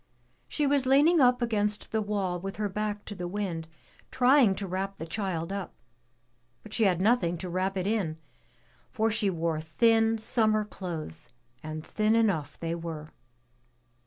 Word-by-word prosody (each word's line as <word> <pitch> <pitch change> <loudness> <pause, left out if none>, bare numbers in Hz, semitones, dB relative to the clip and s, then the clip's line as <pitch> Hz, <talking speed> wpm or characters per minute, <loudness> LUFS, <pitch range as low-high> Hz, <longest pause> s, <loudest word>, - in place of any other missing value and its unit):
She 300 - -1
was 280 -2 +2
leaning 295 +5 +5
up 250 -1 +4
against 210 -3 -1
the 220 - +1
wall 200 -4 -1
with 195 +2 -6
her 210 -1 -1
back 210 +1 -3
to - - -6
the 180 -3 -5
wind, 175 -4 -3 0.4
trying 250 -5 +4
to 200 - -4
wrap 195 +1 -3
the 165 - -6
child 180 -1 -3
up, 200 -2 -5 0.9
but 215 - -10
she 225 - +2
had 180 -3 +2
nothing 190 -4 +2
to 180 - -6
wrap 190 +2 -1
it 185 - -1
in, 195 -7 -1 0.7
for 225 0 0
she 210 -2 +1
wore 165 -3 -1
thin, 225 +7 +3
summer 215 -1 +2
clothes, 170 - -7 0.3
and 155 0 -6
thin 215 +1 +1
enough 185 -11 +1
they 165 0 -2
were. 165 -2 -6
200 Hz, 160 wpm, -28 LUFS, 170-225 Hz, 0.9 s, leaning